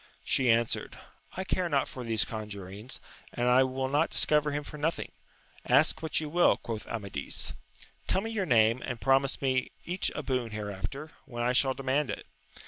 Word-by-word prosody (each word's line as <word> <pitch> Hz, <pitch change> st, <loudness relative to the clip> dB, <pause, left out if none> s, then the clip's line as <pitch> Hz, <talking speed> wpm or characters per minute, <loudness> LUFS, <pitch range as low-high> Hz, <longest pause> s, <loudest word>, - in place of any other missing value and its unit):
She 130 Hz, -2 st, +2 dB
answered, 115 Hz, 0 st, +1 dB, 0.4 s
I 190 Hz, -, -1 dB
care 185 Hz, -2 st, 0 dB
not 140 Hz, -3 st, +2 dB
for 130 Hz, -, -7 dB
these 115 Hz, -2 st, +1 dB
conjurings, 105 Hz, 0 st, -7 dB, 0.4 s
and 120 Hz, 0 st, +1 dB, 0.2 s
will 130 Hz, 0 st, -1 dB
not 145 Hz, +4 st, +2 dB
discover 150 Hz, -1 st, +2 dB
him 145 Hz, 0 st, -2 dB
for 150 Hz, +1 st, -9 dB
nothing. 160 Hz, +3 st, -1 dB, 0.5 s
Ask -, -, +4 dB
what 160 Hz, -2 st, +1 dB
you 155 Hz, -, -3 dB
will, 175 Hz, +4 st, +4 dB
quoth 110 Hz, -2 st, -5 dB
Amadis. 100 Hz, -11 st, -4 dB, 0.3 s
— -, -, -24 dB
Tell 190 Hz, -, +2 dB
me 225 Hz, +2 st, -4 dB
your 200 Hz, -4 st, -1 dB
name, 115 Hz, +1 st, +4 dB
and 125 Hz, -2 st, -4 dB
promise 135 Hz, +1 st, +2 dB
me 130 Hz, -1 st, +1 dB, 0.2 s
each 180 Hz, +2 st, 0 dB
a -, -, -3 dB
boon 125 Hz, -3 st, -1 dB
hereafter, 105 Hz, +9 st, -5 dB
when 120 Hz, -3 st, -4 dB
I 125 Hz, +1 st, +2 dB
shall 130 Hz, 0 st, +3 dB
demand 135 Hz, +2 st, 0 dB
it. -, -, -4 dB
130 Hz, 180 wpm, -30 LUFS, 115-150 Hz, 0.5 s, Ask